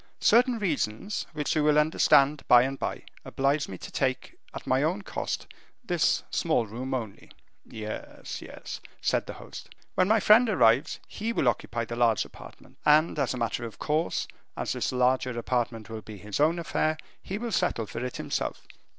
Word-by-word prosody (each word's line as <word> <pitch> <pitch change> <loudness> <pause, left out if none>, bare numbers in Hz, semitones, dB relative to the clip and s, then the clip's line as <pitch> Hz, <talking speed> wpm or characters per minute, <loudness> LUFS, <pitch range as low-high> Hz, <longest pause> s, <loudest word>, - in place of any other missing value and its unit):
"Certain 245 +1 +4
reasons, 175 - -2
which 150 -1 -2
you 155 - +2
will 150 0 +4
understand 150 -2 +4
by 120 0 +8
and 135 +1 -3
by, - - -3 0.2
oblige 140 +2 0
me 95 - -7
to - - -9
take, 130 -2 -1 0.2
at - - -8
my 130 +1 +2
own 175 +7 0
cost, - - -3 0.4
this 175 -9 +1
small 155 -8 +1
room 125 +5 -4
only." 110 -6 -6 0.4
"Yes, 110 -1 -7
yes," - - -8 0.2
said - - 0
the - - -5
host. - - -10 0.2
"When 185 - +3
my 220 +2 +4
friend 220 +4 +6
arrives, 130 - +3
he 220 +2 -3
will 145 - +1
occupy 115 0 0
the 115 - -5
large 115 -4 +3
apartment: - - -14
and 155 +1 +4
as 135 -2 0
a - - -5
matter 115 0 -2
of 115 -2 -7
course, 155 +2 -1 0.3
as - - -1
this - - -1
larger 125 -1 +1
apartment 120 -2 -1
will 110 -1 -6
be 110 -1 -10
his 105 +4 -5
own 160 +4 +3
affair, 155 -1 0 0.2
he 195 - -4
will 235 +1 -4
settle 175 - 0
for 115 +3 -6
it 125 - -4
himself." - - -3
135 Hz, 180 wpm, -28 LUFS, 115-165 Hz, 0.4 s, by